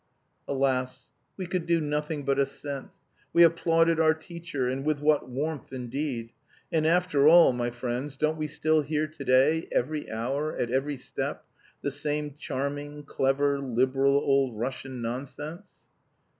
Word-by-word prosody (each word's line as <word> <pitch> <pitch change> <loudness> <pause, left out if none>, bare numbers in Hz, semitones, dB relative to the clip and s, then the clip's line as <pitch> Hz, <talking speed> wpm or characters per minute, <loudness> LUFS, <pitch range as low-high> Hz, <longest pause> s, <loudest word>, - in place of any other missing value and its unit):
"Alas! 130 -2 -1 0.3
We 190 - -4
could 175 -1 -3
do 170 -1 +3
nothing 150 -1 -2
but 140 0 +1
assent. 140 0 -2 0.4
We 170 - +7
applauded 165 0 +3
our 160 -1 +4
teacher 165 -5 -4
and 130 +2 -2
with 150 -1 0
what 150 -2 +2
warmth, 145 +4 -4
indeed! 125 -2 -4 0.4
And, 160 -1 +2
after 165 -4 +3
all, 165 -4 +8
my 120 0 -1
friends, 125 +3 -4
don't 155 +2 +1
we 155 - -1
still 155 +1 +1
hear 150 +1 -1
to 155 -2 -9
day, 135 +5 +3
every 150 +4 -1
hour, 135 +7 -2
at 120 - -1
every 135 +2 0
step, - - -5 0.4
the 140 - -1
same 150 +1 -1
"charming," 145 +1 -4
"clever," 140 0 +1
"liberal," 135 +1 +2
old 135 -4 +2
Russian 125 +1 -4
nonsense? 145 - -6
145 Hz, 145 wpm, -27 LUFS, 130-155 Hz, 0.4 s, all